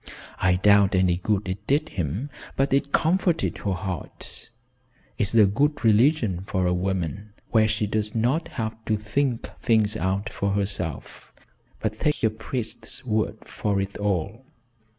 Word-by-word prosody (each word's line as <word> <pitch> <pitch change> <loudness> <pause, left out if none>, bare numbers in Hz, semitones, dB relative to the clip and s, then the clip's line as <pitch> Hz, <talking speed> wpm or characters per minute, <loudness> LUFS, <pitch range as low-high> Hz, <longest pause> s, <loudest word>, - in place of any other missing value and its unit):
I 90 -1 +3
doubt 100 +1 +5
any 90 -2 +3
good 100 +2 -1
it 100 +3 -5
did 145 +3 +2
him, 95 - -3 0.2
but 135 0 +1
it 140 +1 +1
comforted 170 0 +1
her 100 - -1
heart. 90 +3 -6 0.7
It's 105 +1 +1
a 110 -2 +8
good 140 +7 +1
religion 110 - +3
for 95 -1 -1
a 90 - +2
woman, 95 +2 -2 0.2
where 110 -1 +5
she 105 0 0
does 105 +1 -1
not 125 +9 +1
have 110 0 -3
to 110 - +1
think 115 +4 -1
things 110 -3 +3
out 100 0 -1
for 100 -2 -1
herself, 95 -7 -3 0.5
but 110 0 -3
takes 150 -4 0
a 110 - +4
priest's 110 +3 -5
word 110 -2 -1
for 100 -2 -1
it 95 0 -3
all. 100 +4 -1
105 Hz, 150 wpm, -25 LUFS, 95-115 Hz, 0.7 s, a